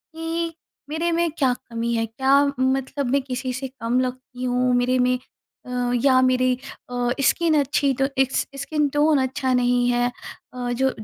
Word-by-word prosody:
कि 330 +1 -3 0.4
मेरे 330 +3 -1
में 340 0 +1
क्या 260 -4 +3
कमी 235 0 -3
है, 225 -1 +1
क्या 265 +5 +3
मतलब 265 +1 0
मैं 280 0 +3
किसी 255 -1 -4
से 265 +2 -4
कम 230 +2 +1
लगती 255 0 -4
हूँ 250 0 +1
मेरे 245 +1 +2
में 250 0 +2 0.5
अ, 245 -1 -2
या 260 -2 +5
मेरी 255 0 +3 0.4
अ, 245 -1 -1
स्किन 320 +2 +3
अच्छी 280 0 +1
तो 270 +1 +1
इकस 265 0 +1 0.2
स्किन 295 +1 0
टोन 295 +1 +3
अच्छा 260 0 -1
नहीं 245 0 +2
है, 245 0 +1 0.4
अ, 245 -1 -3
जो 265 +2 +1
255 Hz, 170 wpm, -23 LUFS, 245-280 Hz, 0.5 s, या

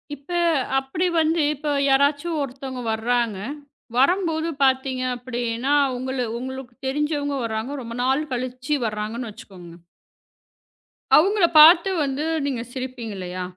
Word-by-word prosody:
இப்போ 290 +6 -7 0.4
அப்படி 270 +7 -2
வந்து 320 +1 +2
இப்போ 295 +1 -3 0.2
யாராச்சும் 285 +4 +2
ஒருத்தவங்க 260 -1 -5
வருகிறாங்க, 230 -1 0 0.6
வரும்போது 325 +3 +2 0.2
பார்த்தீங்க 260 -1 +1
அப்படி 245 0 -6 0.2
என்றால், 275 +2 +2
உங்களு 260 0 -3
உங்களுக்குத் 260 0 -8
தெரிந்தவங்க 285 0 -1
வருகிறாங்க, 225 +4 -3
ரொம்ப 230 0 -7
நாள் 265 +4 +1
கழித்து 255 +3 -2
வருகிறாங்க 215 +1 -3
என்று 240 -3 -5
வைத்துக்கோங்க. 175 -4 -13 1.4
அவங்களை 390 +2 +4
பார்த்து 335 +4 +8
வந்து 275 +1 -2 0.2
நீங்கச் 245 -3 -4
சிரிப்பீங்க 255 -4 -5
இல்லையா? 180 0 -5
265 Hz, 120 wpm, -23 LUFS, 240-290 Hz, 1.4 s, பார்த்து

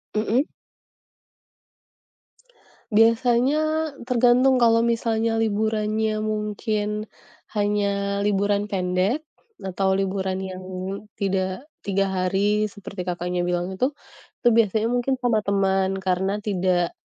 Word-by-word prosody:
Mhm? 225 +6 +2 2.5
Biasanya 235 +6 +4 0.4
tergantung 250 +1 +4
kalau 230 -1 +4
misalnya 230 -1 +1
liburannya 215 0 0
mungkin 210 0 -2 0.5
hanya 200 -1 0
liburan 205 0 +1
pendek 190 +8 0 0.4
atau 190 0 0
liburan 190 -1 -1
yang 185 0 -6 0.5
tidak 195 +5 -2 0.2
tiga 195 0 +1
hari 200 +3 +1
seperti 195 -2 -8
Kakak 175 0 -3 0.2
bilang 175 +1 -1
itu, 255 +9 0 0.5
itu 240 - +5
biasanya 220 -1 +3
mungkin 245 +2 +1
sama 235 -3 +2
teman 195 -1 +1
karena 190 +2 0
tidak 180 -3 +1
205 Hz, 95 wpm, -24 LUFS, 190-225 Hz, 2.5 s, itu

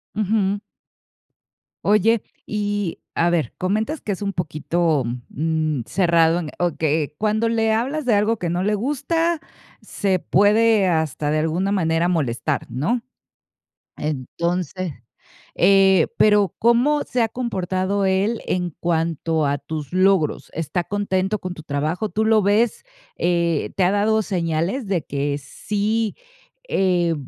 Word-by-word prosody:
Ujú. 205 -1 +1 1.3
Oye, 215 +2 +3 0.2
y 205 -3 -2
a 170 - +2
ver, 165 -8 0
comentas 215 +11 -1
que 205 - -3
es 190 - -8
un 200 -1 -1
poquito, 160 -3 0 0.2
mm, 155 -2 -1
cerrado 170 -2 +3
en 160 -4 -5
o 175 -3 -1
que 155 -1 0
cuando 220 +2 +1
le 225 -1 +2
hablas 270 +7 -1
de 245 - +3
algo 215 +2 +2
que 175 - -2
no 175 +2 -1
le 210 +2 +1
gusta, 315 +8 0 0.4
se 190 -3 -1
puede 210 +2 +3
hasta, 160 -3 0
de 155 +1 +1
alguna 175 +6 0
manera, 165 -3 +1
molestar, 145 -9 -1
¿no? 210 - 0 1.0
Entonces, 170 +5 -3 0.6
eh, 190 -2 +5
pero, 210 -4 +4
¿cómo 245 +6 +3
se 250 - -1
ha 225 - +3
comportado 195 -4 -1
él 195 +4 +1
en 180 -1 -1
cuanto 165 -2 0
a 140 0 +1
tus 150 -1 -6
logros? 185 -3 +2
¿Está 165 +2 -2
contento 200 0 -1
con 185 -1 -5
tu 160 - -11
trabajo? 155 +7 -2
¿Tú 210 +3 -1
lo 220 -1 +4
ves? 210 - +1 0.3
Eh, 170 -2 0
¿te 190 - +2
ha 180 - +3
dado 215 +2 +2
señales 180 - -1
de 180 -6 0
que 140 0 -2
sí, 210 +9 -2 0.5
eh, 175 -3 +2
185 Hz, 135 wpm, -22 LUFS, 165-215 Hz, 1.3 s, eh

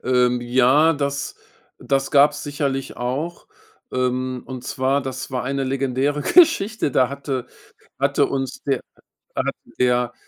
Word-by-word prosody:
Ähm, 125 -1 +2
ja, 130 +6 +4
das 140 -2 -2 0.4
das 135 -1 0
gab's 145 +1 +4
sicherlich 140 -2 -3
auch. 140 +8 -3 0.5
Ähm, 130 0 -1
und 130 -2 -7
zwar, 135 +1 0
das 130 0 -5
war 125 -1 -2
eine 135 +1 -1
legendäre 135 +2 0
Geschichte. 225 - +4
Da 130 -1 +3
hatte 140 -2 -4 0.5
hatte - - +2
uns 135 -1 -3
der 135 -3 0 0.6
da - - +1
hat - - -1 0.2
der, 125 -1 +2
135 Hz, 135 wpm, -22 LUFS, 125-140 Hz, 0.6 s, ja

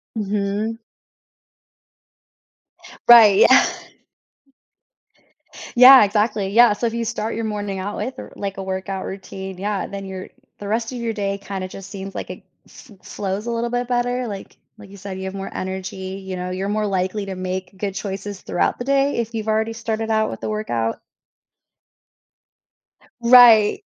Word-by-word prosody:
Mhm. 210 +1 -2 2.3
Right, 220 -4 +8
yeah. 260 +4 +7 2.1
Yeah, 255 +1 +10
exactly. 210 -1 0
Yeah, 230 +1 +6
so 235 +3 -2
if 225 - -4
you 235 0 -2
start 220 0 -3
your 225 0 -3
morning 205 -2 -3
out 200 +2 -4
with 255 - -3
a - - -9
w - - -30
like, 195 -1 -5
a 195 - -4
workout 190 0 -4
routine, 190 -1 -7
yeah, 200 +1 -2
then 195 0 -7
your 190 -1 -7 0.3
the 205 - -7
rest 225 +3 -1
of 255 - -6
your 235 -1 -3
day 200 -2 -2
kinda 195 -1 -6
just 195 0 -10
seems 195 -1 -7
like - - -5
it - - -9 0.2
fl 210 - -16
flows 200 +1 -4
a - - -1
little 235 +1 -2
bit 245 0 -2
better, 245 0 -1
like, 200 -3 -8 0.2
like 210 -2 -14
you 200 - -12
said, 195 -1 -7
you 190 - -6
have 190 - -5
more 195 0 -5
energy, 190 0 -5
you 190 -1 -5
know? 180 0 -4
You're 190 +2 -3
more 210 0 0
likely 195 +1 -2
to 195 -1 -6
make 185 +1 -5
good 195 -1 -3
choices 195 0 -6
throughout - - -1
the 245 - -4
day 275 0 +1
if 235 0 -3
you've 220 -1 -4
already 220 +1 0
started 225 0 -3
out 220 0 +1
with - - -8
the - - -3
workout. 120 - -2 2.2
Right. 235 - +7
205 Hz, 170 wpm, -21 LUFS, 195-225 Hz, 2.3 s, Yeah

